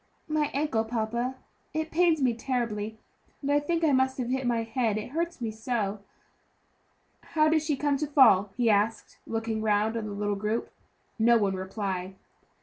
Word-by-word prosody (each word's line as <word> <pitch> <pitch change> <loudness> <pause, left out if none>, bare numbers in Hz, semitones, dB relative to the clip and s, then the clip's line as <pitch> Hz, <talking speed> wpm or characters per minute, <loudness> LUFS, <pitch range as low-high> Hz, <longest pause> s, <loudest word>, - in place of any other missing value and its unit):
"My 305 -2 +1
ankle, 275 -6 0
papa; 235 +3 -2 0.4
it 315 0 -2
pains 330 -3 +3
me 250 -2 +3
terribly; 225 -3 -2 0.5
and 280 - 0
I 290 - +4
think 330 +3 -1
I 310 - +4
must 260 0 +2
have 245 -2 -2
hit 260 0 -1
my 230 -1 +1
head, 225 -2 0
it 215 +3 -5
hurts 335 +2 -2
me 230 -3 -2
so." 220 -2 -2 1.2
"How 310 -1 +2
did 315 0 +3
she 305 -1 0
come 290 0 +1
to 300 +2 -2
fall?" 230 -9 +5
he 240 -2 +2
asked, 215 +1 +1
looking 225 -1 -2
round 215 +1 +1
upon 220 -2 -3
the 205 - -5
little 205 0 -1
group. 210 +3 -2 0.5
No 235 +1 +5
one 200 -3 +1
replied. 190 -1 -4
235 Hz, 175 wpm, -28 LUFS, 215-280 Hz, 1.2 s, fall